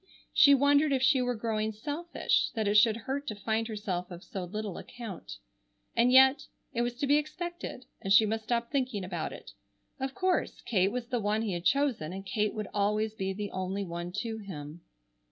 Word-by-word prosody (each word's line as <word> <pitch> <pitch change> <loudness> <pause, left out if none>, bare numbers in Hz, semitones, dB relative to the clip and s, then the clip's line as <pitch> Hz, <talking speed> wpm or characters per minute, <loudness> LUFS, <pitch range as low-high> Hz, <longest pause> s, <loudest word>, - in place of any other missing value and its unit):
She 280 -1 +8
wondered 285 +2 +4
if 265 -1 +1
she 265 -1 +5
were 245 0 0
growing 220 -1 -1
selfish, 295 +11 -1
that 220 -2 0
it 205 - +2
should 215 +1 +5
hurt 280 +2 -3
to 215 - -3
find 220 +2 -1
herself 200 -5 -3
of 175 0 -9
so 190 -2 -5
little 205 0 -5
account. 225 -7 -8 0.6
And, 240 +2 +4
yet, 265 +2 +6 0.3
it 235 - 0
was 240 0 -1
to 280 - 0
be 285 +1 +5
expected, 325 -2 -5 0.2
and 195 - -3
she 215 +2 +7
must 220 +1 -2
stop 235 0 -1
thinking 255 -8 -1
about 175 -3 -3
it. - - -10 0.5
Of 265 0 -3
course, 370 -1 0
Kate 195 -3 +1
was 245 -1 -4
the 245 -2 0
one 210 +1 0
he 210 -4 -1
had 175 0 -4
chosen 260 - +1
and 195 +1 -7
Kate 210 +2 -1
would 215 -2 -3
always 210 +1 +1
be 195 -3 -2
the 205 +1 -4
only 190 +2 -2
one 175 -1 -5
to 225 -1 -4
him. 165 -5 -8
220 Hz, 200 wpm, -30 LUFS, 200-260 Hz, 0.6 s, She